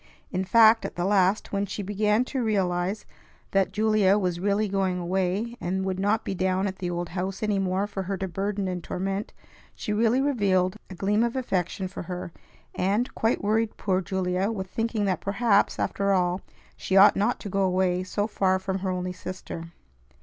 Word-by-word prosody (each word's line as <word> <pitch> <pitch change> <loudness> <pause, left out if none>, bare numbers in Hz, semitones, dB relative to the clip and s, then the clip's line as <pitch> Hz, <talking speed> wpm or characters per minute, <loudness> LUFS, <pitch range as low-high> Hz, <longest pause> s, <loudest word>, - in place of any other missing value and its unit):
In 185 0 -1
fact, 225 +3 +6
at - - -5
the 175 - -1
last, 195 0 +2
when 200 0 -1
she 205 - -4
began 210 +4 +1
to 265 0 -3
realize 190 -2 0 0.5
that 195 -2 +2
Julia 210 -1 +3
was 180 -4 -1
really 205 +3 +1
going 190 -2 0
away, 190 +6 -1
and 190 +2 -1
would 190 -1 -2
not 205 +3 +1
be - - -2
down 185 +1 0
at 190 -1 -3
the 180 -2 -2
old 175 -1 -3
house 190 +3 -4
any 210 -2 +1
more 190 +1 0
for 205 -1 -5
her 190 +1 -3
to 190 - -3
burden 195 +2 -2
and 180 -2 -4
torment, 195 +2 -3 0.4
she 210 - -3
really 225 +4 +3
revealed 200 -9 +2
a 190 - -8
gleam 205 +4 +1
of 235 +1 -1
affection 190 -6 -1
for 185 - -7
her, 180 0 -6 0.4
and 205 +7 0
quite 225 -1 0
worried 220 +2 +1
poor 190 -2 0
Julia 185 +1 -1
with 190 -4 -4
thinking 225 -2 -1
that 185 -3 0
perhaps, 200 +1 +2
after 200 0 0
all, 180 0 +1 0.3
she 190 - 0
ought 195 +2 +8
not 210 +5 +1
to 205 - -5
go 195 +1 0
away 185 -1 +2
so 205 +2 -1
far 190 -3 +1
from 190 0 -3
her 190 0 -2
only 180 0 -2
sister. 180 -2 -7
195 Hz, 195 wpm, -26 LUFS, 185-210 Hz, 0.5 s, ought